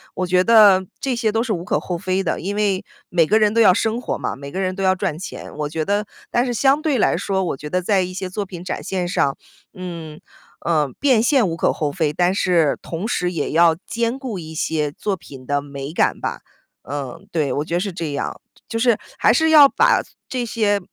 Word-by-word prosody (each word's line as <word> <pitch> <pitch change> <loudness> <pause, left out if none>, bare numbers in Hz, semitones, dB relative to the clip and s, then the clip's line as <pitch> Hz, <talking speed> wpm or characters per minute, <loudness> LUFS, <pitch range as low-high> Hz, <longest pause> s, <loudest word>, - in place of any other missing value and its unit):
我 185 - -1
觉 180 +1 +3
得 205 -5 +6 0.2
这 270 -2 0
些 230 -2 0
都 225 +2 +1
是 250 - -3
无 175 -2 -4
可 - - +1
厚 175 - -4
非 185 +2 -1
的， 170 - -1
因 200 +3 -3
为 200 -3 0 0.2
每 170 -2 +3
个 210 +7 +3
人 210 -1 +3
都 230 - +2
要 190 -4 +7
生 225 +4 0
活 - - -3
嘛， - - -3
每 140 0 -8
个 185 - -4
人 185 0 -1
都 195 - -5
要 190 0 +3
赚 170 -4 -2
钱。 190 - -8
我 150 -1 -2
觉 160 +1 -2
得 205 +3 0 0.3
但 240 +1 +2
是 245 - -2
相 275 +5 +3
对 300 -4 +1
来 - - +2
说， 190 -1 -1
我 155 - -2
觉 150 +2 -7
得 180 +3 0
在 195 +1 +2
一 185 0 -4
些 185 0 -4
作 200 +2 -3
品 180 -2 -9
展 185 - -4
现 185 -2 -2
上， 140 -6 +1 0.4
嗯， 170 -4 -7 0.4
呃， 155 -4 +1
变 260 -5 +4
现 260 -2 +3
无 165 - -4
可 - - +2
厚 150 -2 -2
非， 155 -2 -1
但 175 +3 +2
是 170 -7 +2
同 170 +5 -5
时 180 -6 -1
也 155 -4 -2
要 165 0 +5
兼 235 +2 -1
顾 245 -8 -5
一 160 -1 -9
些 155 -1 -1
作 200 -2 -2
品 135 -6 -13
的 145 +1 0
美 140 0 -7
感 170 - +1
吧。 - - -3 0.5
嗯， 140 +6 -6
对， 155 -5 0
我 145 - -2
觉 165 - -6
得 - - +2
是 200 +2 -2
这 165 -4 -4
样。 140 - -4 0.3
就 225 - -2
是 235 0 +3 0.2
还 - - +4
是 320 0 +3
要 300 -3 +9
把 470 - +3 0.3
这 250 -2 -2
些 210 -3 +1
185 Hz, 255 characters per minute, -21 LUFS, 160-220 Hz, 0.5 s, 要